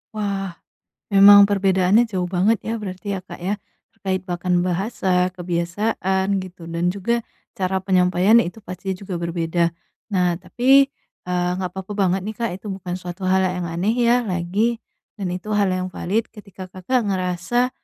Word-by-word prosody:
Wah, 195 -4 -3 0.6
memang 200 +1 +9
perbedaannya 195 +2 +3
jauh 185 -4 -1
banget 190 +5 +2
ya 225 - -2
berarti 185 0 -7
ya 195 - -2
Kak 185 - -10
ya 195 +4 -1 0.4
terkait 190 -3 -2
bahkan 180 -1 0
bahasa, 185 -1 0
kebiasaan, 190 +2 -1
gitu 180 -2 -10
dan 170 +1 0
juga 205 +6 -1 0.3
cara 190 -3 -1
penyampaiannya 185 +4 +4
itu - - -20
pastinya 190 0 -5
juga 185 - -4
berbeda. 170 0 0 0.5
Nah, 180 -2 +2
tapi, 260 +8 +4 0.4
eee, 180 0 0
nggak 185 -2 -3
papa 190 +1 -7
banget 190 -1 +1
nih 215 +1 -5
Kak 230 -3 -1
itu 210 - -11
bukan 180 -2 -6
suatu 180 +1 -8
hal 190 0 +4
yang 180 -1 -2
aneh 180 +7 0
ya 245 0 +3
lagi 195 +5 0 0.4
dan 195 -4 -4
itu 185 +4 -6
hal 200 -2 +3
yang 185 0 -1
valid 215 +6 -1
ketika 195 -3 -10
Kakak 200 +6 -1
ngerasa 185 +6 0
190 Hz, 160 wpm, -22 LUFS, 180-205 Hz, 0.6 s, memang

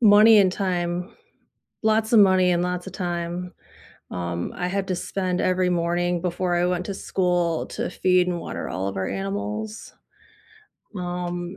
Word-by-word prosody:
money 215 0 +7
and 190 -2 +5
time, 180 0 -2 0.7
lots 220 +1 +2
of 225 - +8
money 185 -2 +5
and 175 0 +2
lots 180 0 -2
of - - -7
time. 175 -1 -3 0.6
Um, 85 -1 -3
I 180 - -2
had 195 +1 -2
to 185 - 0
spend 185 -1 -2
every 185 0 +2
morning 175 0 0
before 180 0 -1
I 175 0 +2
went 180 0 -1
to 200 - -4
school 175 -4 0
to - - -3
feed 180 -1 +2
and 175 -1 -1
water - - -5
all 95 +1 -3
of 100 - -5
our 95 0 -1
animals. 100 - -4 1.0
Um, 175 0 -4
180 Hz, 160 wpm, -24 LUFS, 175-185 Hz, 1.0 s, of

